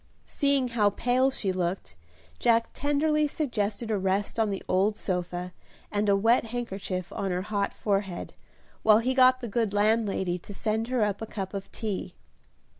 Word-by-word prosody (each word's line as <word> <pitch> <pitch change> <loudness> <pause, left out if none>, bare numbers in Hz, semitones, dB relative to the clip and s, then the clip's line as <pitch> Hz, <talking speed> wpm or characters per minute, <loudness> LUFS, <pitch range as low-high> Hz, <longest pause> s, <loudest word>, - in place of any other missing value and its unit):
Seeing 280 -3 +1
how 215 -3 +3
pale 250 +6 +2
she 210 -7 -1
looked, 180 - -3 0.4
Jack 230 -1 +3
tenderly 300 +2 +1
suggested 225 -7 -2
a 210 - +1
rest 195 +3 -1
on 220 -1 +2
the 195 -1 -4
old 200 +3 +2
sofa, 180 -2 -3 0.4
and 205 0 +1
a 200 - +5
wet 225 +4 +3
handkerchief 200 -6 -4
on 195 - -2
her 180 0 -1
hot 200 -1 -1
forehead, 195 -3 -2 0.5
while 215 -1 +6
he 245 +4 +1
got 255 0 +5
the 240 - -4
good 220 -1 -1
landlady 205 -4 +1
to 200 +3 -10
send 220 +2 -1
her 250 -3 +1
up 205 0 -1
a 225 - -4
cup 195 -2 -5
of 195 -1 -6
tea. 210 -4 -4
210 Hz, 170 wpm, -27 LUFS, 195-240 Hz, 0.5 s, while